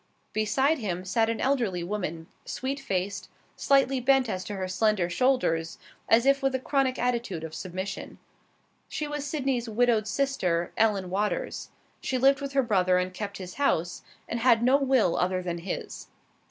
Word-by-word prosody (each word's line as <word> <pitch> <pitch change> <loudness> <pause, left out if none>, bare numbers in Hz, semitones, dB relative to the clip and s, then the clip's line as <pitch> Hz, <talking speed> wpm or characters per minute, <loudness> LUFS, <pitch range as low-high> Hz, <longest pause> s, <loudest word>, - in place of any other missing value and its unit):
Beside 265 +9 +2
him 185 -5 -3
sat 225 +4 +1
an 230 - -2
elderly 235 -10 0
woman, 170 -4 -4 0.2
sweet 270 +2 -4
faced, 195 -4 -3 0.3
slightly 270 -1 +3
bent 265 0 +3
as 185 -3 -3
to 205 - -5
her 190 -1 -3
slender 185 -2 +1
shoulders, 170 -8 +1 0.3
as 230 +2 +5
if 275 0 +4
with 270 -1 +1
a - - 0
chronic 265 -1 0
attitude 235 -9 -1
of 160 -1 -6
submission. 185 +4 -6 0.7
She 300 - -3
was 295 -1 -4
Sydney's 265 -5 -1
widowed 225 -1 +2
sister, 190 -11 0
Ellen 205 -5 +1
Waters. 205 +2 -2 0.3
She 260 - -1
lived 270 +2 +4
with 280 -1 -5
her 270 -1 +3
brother 185 -5 +2
and 180 0 -1
kept 200 +1 -5
his 185 -2 -8
house, 175 - +1 0.3
and 235 - -3
had 230 -1 +4
no 260 +3 +5
will 260 -10 +2
other 185 0 0
than 170 -1 -3
his. 175 - -6
220 Hz, 165 wpm, -27 LUFS, 185-265 Hz, 0.7 s, as